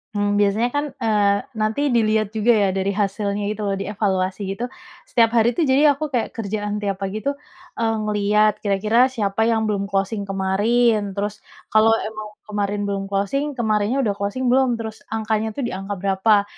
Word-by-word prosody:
Mmm, 205 0 +1
biasanya 210 +4 +2
kan, 290 +1 +1
eee, 205 -2 +2 0.2
nanti 215 +5 -1
dilihat 215 -2 +2
juga 220 +3 +3
ya, 205 -3 +3
dari 195 +1 0
hasilnya 200 0 -1
itu 215 0 -3
loh, 200 -1 0
dievaluasi 195 -1 -1
gitu, 235 +5 -3 0.4
setiap 230 -1 +3
hari 230 -1 +3
tuh, 335 - +1
jadi 285 +1 +4
aku 310 - -5
kayak 240 -3 -2
kerjaan 210 -1 -3
tiap 195 -1 -2
pagi 200 +2 -4
tuh, 280 +1 -2 0.4
eee, 225 -1 +1
ngelihat 210 0 +2
kira-kira 215 +5 +3
siapa 220 -3 0
yang 225 -1 +2
belum 200 -2 -1
closing 195 +1 -2
kemarin. 205 +2 +1
Terus 205 +1 -3 0.3
kalau 225 +1 +5
emang 215 -1 -7 0.2
kemarin 205 -1 -2
belum 195 -1 -2
closing 265 +9 -1
kemarinnya 215 +1 0
udah 210 - +1
closing 205 +6 -2
belum? 260 -2 +3
Terus 220 -1 -6 0.2
angkanya 220 0 -1
tuh 275 - -3
di - - -5
angka 195 +2 -4
berapa? 200 +2 +2
210 Hz, 175 wpm, -21 LUFS, 200-225 Hz, 0.4 s, kalau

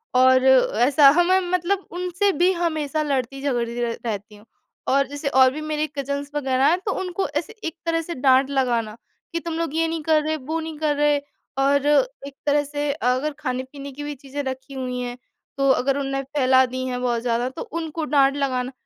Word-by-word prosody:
और 260 0 +5
ऐसा। 265 +2 +5
हमें 370 +2 +4
मतलब 365 +2 0
उनसे 360 +3 0
भी 360 +1 +5
हमेशा 315 -3 -1
लड़ती-झगड़ती 260 -3 -2
र 230 -1 -1
रहती 210 -1 -4
हूँ। 205 +1 -17 0.4
और 275 +1 +3
जैसे 285 +1 -5
और 260 -1 +5
भी 305 +3 -6
मेरी 305 0 -2
कज़िन्स 280 +1 -3
वग़ैरह 265 -2 +1
हैं 345 +4 +3
तो 405 - 0
उनको 375 0 -2
ऐसे 300 +9 -3
एक 325 - -5
तरह 330 0 +1
से 335 +1 -6
डाँट 265 +1 +4
लगाना, 240 -5 0 0.4
कि 335 - 0
"तुम 335 0 -5
लोग 330 -2 -2
ये 330 0 +2
नहीं 325 0 -3
कर 310 0 +3
रहे, 310 +1 -1
वो 310 +4 -4
नहीं 320 -1 -6
कर 305 -2 +1
रहे" 295 0 +3 0.4
और 280 +1 +2 0.4
एक 280 - -10
तरह 290 0 +3
से 290 0 -2 0.2
अगर 290 +4 -2
खाने-पीने 265 +1 -5
की 290 +2 -8
भी 290 0 -5
चीज़ें 275 +1 -6
रखी 265 +1 -6
हुई 255 -1 -4
हैं 245 0 -5 0.4
तो 275 0 +2
अगर 270 +1 +1
उनने 275 0 -2
फैला 260 -2 +3
दी 255 +1 -4
हैं 250 -1 -3
बहुत 240 -2 0
ज़्यादा, 240 +1 0
तो 260 - -8
उनको 330 -8 -4
डाँट 275 -1 +3
लगाना। 260 -3 -1
280 Hz, 195 wpm, -23 LUFS, 260-310 Hz, 0.4 s, और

